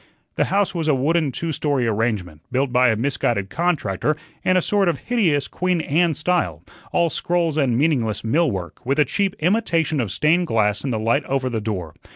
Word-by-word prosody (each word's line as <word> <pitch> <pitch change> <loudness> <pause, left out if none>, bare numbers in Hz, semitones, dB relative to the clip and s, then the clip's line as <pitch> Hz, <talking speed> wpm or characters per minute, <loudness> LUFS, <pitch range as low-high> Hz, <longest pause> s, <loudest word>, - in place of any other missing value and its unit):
The - - +1
house 200 0 +1
was 165 -3 -2
a 150 - +4
wooden 150 +2 +1
two 165 +6 -3
story 145 -4 0
arrangement, 105 -8 -1
built 130 0 0
by 125 0 +5
a 110 - +2
misguided 115 -5 -1
contractor 150 - 0 0.3
in 185 - +3
a - - +5
sort 200 -3 +2
of 165 - -1
hideous 170 - 0
Queen 180 -1 -1
Anne 160 +1 +1
style, 155 - -1 0.3
all 170 -2 +2
scrolls 170 -3 0
and 135 -6 +1
meaningless 130 -7 +1
mill 150 +8 +2
work, 95 +1 -6
with 135 +4 0
a 150 - +4
cheap 195 +7 -1
imitation 165 - +1
of 110 -6 -3
stained 165 - +2
glass 105 -5 +1
in 140 - -2
the 115 - -1
light 115 +7 +1
over 130 -1 -1
the 110 -2 -2
door. 95 -7 -4
140 Hz, 195 wpm, -21 LUFS, 115-170 Hz, 0.3 s, by